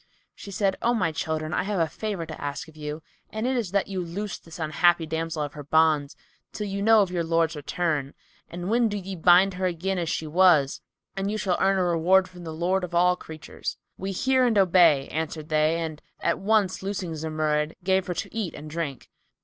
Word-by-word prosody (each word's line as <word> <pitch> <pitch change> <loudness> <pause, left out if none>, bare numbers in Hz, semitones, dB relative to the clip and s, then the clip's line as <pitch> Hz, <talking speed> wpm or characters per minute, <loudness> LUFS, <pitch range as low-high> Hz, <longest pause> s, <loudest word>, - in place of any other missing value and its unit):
She - - -11
said, 195 -1 0
"O 240 +1 +2
my 180 -7 +1
children, 155 +1 -3
I - - +1
have 195 0 -2
a 165 - +4
favour 195 0 -4
to 160 0 -9
ask 145 +2 -4
of 160 - -16
you, 150 +1 -6 0.3
and 220 +2 -4
it 260 +1 +1
is 230 -7 -1
that 200 +1 0
you 190 -2 -3
loose 195 +4 -5
this 165 -1 -12
unhappy 170 +1 +2
damsel 160 0 -2
of 145 - -5
her 150 - -8
bonds, 150 -1 +2 0.4
till 210 - -4
you 200 0 -3
know 220 0 +6
of 185 - -5
your 175 -2 -1
lord's 165 0 +1
return, 150 -2 -2 0.3
when 220 +7 0
do 205 - -3
ye 195 0 -6
bind 180 +3 +5
her 185 0 -1
again 180 +2 -2
as 170 -2 -2
she 160 - -2
was; 155 -4 +4 0.3
and 195 +1 -2
you 215 - -2
shall 190 -4 0
earn 195 0 +3
a 185 - +2
reward 180 +2 +3
from 180 -1 -12
the 160 - -5
Lord 180 +4 0
of 175 -1 -4
all 180 +1 +4
creatures." 160 -3 -7 0.2
"We 195 +1 -4
hear 260 +7 +2
and 225 -3 +1
obey," 170 -7 +5
answered 155 0 -4
they 155 +1 +2
and 160 -2 -5 0.2
at - - 0
once 205 -2 +1
loosing 190 -3 -3
Zumurrud, 155 -1 -1
gave 190 0 +1
her 180 - -2
to - - -5
eat 215 -6 -3
and 150 +1 -9
drink. 150 -6 -4
175 Hz, 215 wpm, -26 LUFS, 155-195 Hz, 0.4 s, know